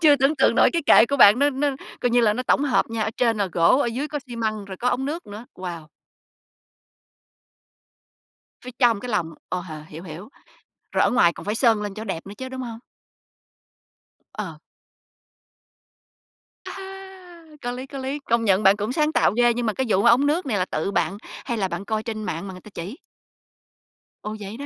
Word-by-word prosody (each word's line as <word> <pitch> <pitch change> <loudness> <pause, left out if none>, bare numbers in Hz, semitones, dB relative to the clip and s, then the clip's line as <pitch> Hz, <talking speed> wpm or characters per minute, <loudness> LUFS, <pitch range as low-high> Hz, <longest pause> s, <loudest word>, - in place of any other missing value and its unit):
chưa 300 -3 +6
tưởng 275 +3 +2
tượng 265 - +3
nổi - - +5
cái 335 -2 0
kệ 235 - +7
của 280 - -1
bạn 220 -2 +8
nó 285 +1 +3
nó 285 +2 0 0.3
coi 245 - +1
như 240 0 +4
là 210 -2 +4
nó 250 +4 -3
tổng 280 +3 +2
hợp 270 - +1
nha, 225 -1 -1
ở 220 - -1
trên 230 -3 +2
là 200 - +1
gỗ, 170 - +4
ở - - +1
dưới 255 +6 -3
có 300 - -3
xi 240 -2 -8
măng, 215 -2 -2
rồi 190 -1 -8
có 245 +6 0
ống 265 - 0
nước 315 +5 -4
nữa. 210 +3 -9
Wow. 175 -4 -7 2.8
Phía 250 - -6
trong 235 -5 +4
cái 250 - -7
lòng, 170 -7 -1 0.2
ồ, 180 - -2
h 175 -2 -10 0.2
hiểu, 160 +3 -10
hiểu, 180 +7 -9 0.6
rồi - - +2
ở - - +2
ngoài 170 -8 +4
còn - - -11
phải 210 - -1
sơn 225 -3 +3
lên 205 -1 -4
cho 215 - -7
nó - - -10
đẹp 165 - -9
nữa 200 - -8
chứ, 260 0 -6
đúng 260 0 -6
hông? 230 -2 -7 1.5
Ờ. - - -6 2.1
À - - -7
ha! 380 -3 -11 0.2
Có 245 - -3
lý, 255 +2 -6
có 275 - -9
lý, 270 +2 -3
công 230 -1 +2
nhận 195 +1 +3
bạn 195 +1 +6
cũng 210 +3 -2
sáng 305 +1 +1
tạo - - +3
ghê, 240 0 +4
nhưng 240 0 -2
mà 215 - 0
cái 265 - -1
vụ 195 -2 +3
mà 235 - +6
ống 250 +4 +5
nước 310 +3 0
này 225 -6 0
là 185 - +1
tự 160 +4 -2
bạn, 200 0 0 0.3
hay 235 - -2
là 195 -3 0
bạn 180 +2 -5
coi 215 +1 -2
trên 220 -2 -5
mạng 170 0 -4
mà 190 - -7
người 185 - -11
ta - - -13
chỉ? 190 - -7 1.3
Ồ, 215 0 -5
vậy 205 +2 -7
đó 285 - -6
230 Hz, 225 wpm, -23 LUFS, 200-265 Hz, 2.8 s, bạn